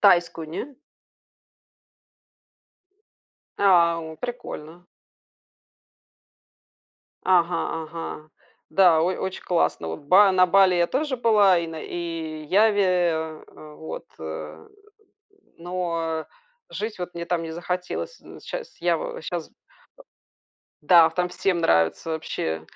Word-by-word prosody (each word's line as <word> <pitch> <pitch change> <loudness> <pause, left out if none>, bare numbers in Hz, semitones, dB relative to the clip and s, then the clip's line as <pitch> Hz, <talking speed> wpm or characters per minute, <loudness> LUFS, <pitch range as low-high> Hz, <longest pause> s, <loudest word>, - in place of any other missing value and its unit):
тайскую, 175 -4 +3
не? 255 - -6 2.8
А, 170 -4 +4
о, - - -12
прикольно. 175 -7 -7 2.4
Ага-ага. 165 -3 -1 0.4
Да, 180 -5 +5
ой 180 +2 0
очень 190 0 -4
классно. 170 - 0
Вот 80 - -5
ба 190 +7 +5
на 185 0 +5
Бали 190 0 +5
я 175 -1 +3
тоже 275 - -1
была 210 -6 +4
и 170 - -3
на 160 -1 -7
и 165 -3 -5
Яве, 205 +5 +3
э 165 -4 0
э, 150 -1 -13
вот, 160 +2 -8
э. 80 0 -8 0.9
Но 165 -2 -3 0.4
жить 215 0 -5
вот 180 0 -6
мне 170 0 -4
там 170 -1 -1
не 165 - -6
захотелось. 180 - -4
З - - -13
щас - - -7
Ява - - -1
щас, - - -4
э - - -35 1.3
Да, 170 -3 +7
в 160 - -15
там 180 0 0
всем 180 0 0
нравится 85 - +2
вообще. 80 - -3
175 Hz, 115 wpm, -24 LUFS, 160-190 Hz, 2.8 s, Да